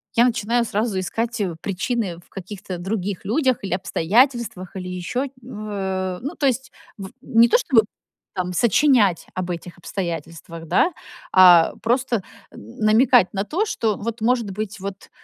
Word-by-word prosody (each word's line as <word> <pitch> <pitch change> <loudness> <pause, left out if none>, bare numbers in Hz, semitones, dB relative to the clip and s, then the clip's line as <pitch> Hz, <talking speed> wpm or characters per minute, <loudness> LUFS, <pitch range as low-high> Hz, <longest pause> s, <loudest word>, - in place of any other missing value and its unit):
я 235 - +5
начинаю 235 0 +1
сразу 215 -2 -1
искать, 230 +5 -3
э, 180 -5 -2
причины 200 -1 -2
в 175 - -23
каких-то 195 -1 -7
других 195 0 -3
людях 255 +2 +1
или 190 - -2
обстоятельствах, 200 - +1
или 180 -1 -6
ещё 215 +10 -3
в, 215 -3 -8
э, 190 -2 -3
ну 285 +7 -5
то 285 - -1
есть, 265 0 -1 0.3
в 195 -2 -7
не 235 -3 +4
то - - +5
чтобы, 255 - +3 0.5
там, 180 -1 -2
сочинять 230 - +3
об 185 -1 -3
этих 175 0 -7
обстоятельствах, 165 -2 -6
да, 345 - +3 0.4
а 180 -3 +7
просто 240 -2 0 0.3
н 110 +2 -13
намекать 220 -2 +4
на 195 0 -2
то, 370 - -1
что 220 - -1
вот, 230 +2 -5
может 235 -3 +1
быть 215 +2 -5
вот, 195 0 -7
205 Hz, 160 wpm, -22 LUFS, 185-235 Hz, 0.5 s, а